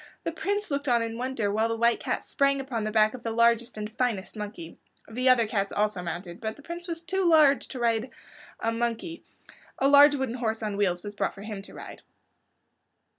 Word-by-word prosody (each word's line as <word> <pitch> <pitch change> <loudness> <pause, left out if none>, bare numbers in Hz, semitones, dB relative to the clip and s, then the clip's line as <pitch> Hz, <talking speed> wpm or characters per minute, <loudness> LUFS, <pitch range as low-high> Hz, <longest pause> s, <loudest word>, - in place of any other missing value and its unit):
The - - -2
Prince 410 -2 -2
looked 280 +1 -2
on 240 -2 +3
in 225 0 -4
wonder 245 -5 -1
while 220 +2 +1
the 230 - -1
White 235 +1 +2
Cat - - -2
sprang 275 -1 +1
upon 255 -5 -3
the 215 - -2
back 215 0 +3
of 255 - -8
the 230 - -3
largest 235 +1 +2
and 210 0 -5
finest 230 -6 -2
monkey. 205 -6 -8 0.3
The 250 +3 +1
other 245 -3 +5
cats 200 -2 -1
also 210 -3 0
mounted, 175 +1 -6
but 220 - -4
as 220 - -8
the 290 - -16
Prince 340 +2 -7
was 330 -1 -4
too 375 +3 -1
large 305 -5 +5
to 255 - -7
ride 230 +1 +1 0.5
a 225 - 0
monkey 235 +8 -3 0.5
a 270 - +2
large 285 +1 +7
wooden 265 -4 -2
horse 225 -3 -2
on 210 -2 -2
wheels 185 -3 0
was 205 -1 -6
brought 200 -1 -2
for 200 - -10
him 210 -2 -6
to 195 - -14
ride. - - -10
230 Hz, 220 wpm, -27 LUFS, 210-270 Hz, 0.5 s, large